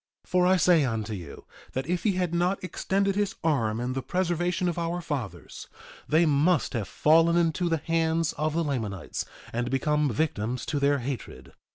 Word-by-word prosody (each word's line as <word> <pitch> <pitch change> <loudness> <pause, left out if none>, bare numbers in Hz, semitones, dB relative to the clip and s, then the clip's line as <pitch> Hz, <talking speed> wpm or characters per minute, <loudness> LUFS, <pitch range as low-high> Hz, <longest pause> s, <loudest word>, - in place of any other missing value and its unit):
1:14 - - -25
For 180 0 +4
I 185 +1 +5
say 170 -2 +4
unto 110 -4 -2
you, 85 -8 -8 0.3
that 130 0 -2
if 175 +2 -1
he 205 -1 +2
had 180 -2 -1
not 180 +3 0
extended 195 +1 0
his 205 -1 0
arm 115 -9 +1
in 125 +1 -2
the 135 - -2
preservation 175 +4 0
of 175 -1 -1
our 170 +1 -2
fathers 140 - -6 0.4
they 160 +3 +4
must 150 +2 +2
have 110 -6 -2
fallen 165 +2 +4
into 170 +1 +1
the 165 - +2
hands 165 0 0
of 155 +1 -2
the 170 - +1
Lamanites, 110 - -3 0.3
and 120 +1 -1
become 150 +2 +1
victims 120 -2 -1
to 145 - -1
their 140 +1 +3
hatred. 130 -2 -6
160 Hz, 185 wpm, -27 LUFS, 130-175 Hz, 0.4 s, I